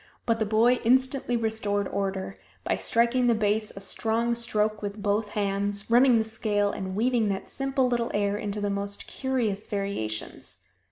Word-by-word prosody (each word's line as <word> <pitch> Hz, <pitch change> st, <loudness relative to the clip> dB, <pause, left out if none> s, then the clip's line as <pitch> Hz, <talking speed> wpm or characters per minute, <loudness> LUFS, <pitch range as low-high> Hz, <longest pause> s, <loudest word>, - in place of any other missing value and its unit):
But 230 Hz, -1 st, +1 dB
the 220 Hz, -, 0 dB
boy 235 Hz, +4 st, +4 dB
instantly 260 Hz, 0 st, +2 dB
restored 215 Hz, -3 st, -1 dB
order 195 Hz, 0 st, -3 dB, 0.2 s
by -, -, 0 dB
striking 240 Hz, +2 st, +2 dB
the 235 Hz, -, +4 dB
bass 215 Hz, 0 st, +1 dB
a -, -, -7 dB
strong 225 Hz, +4 st, 0 dB
stroke 215 Hz, -2 st, 0 dB
with 205 Hz, +1 st, -5 dB
both 205 Hz, +1 st, 0 dB
hands, 200 Hz, +1 st, -1 dB
running 245 Hz, 0 st, +6 dB
the 220 Hz, -, +2 dB
scale, 210 Hz, -2 st, 0 dB
and 190 Hz, -1 st, -5 dB
weaving 230 Hz, 0 st, +2 dB
that 195 Hz, -1 st, -4 dB
simple 270 Hz, -1 st, +1 dB
little 240 Hz, -1 st, 0 dB
air 205 Hz, 0 st, 0 dB
into 210 Hz, 0 st, -3 dB
the 205 Hz, -1 st, -1 dB
most 200 Hz, 0 st, -4 dB
curious 240 Hz, -7 st, -2 dB
variations. 195 Hz, -, -4 dB
215 Hz, 165 wpm, -27 LUFS, 200-235 Hz, 0.2 s, running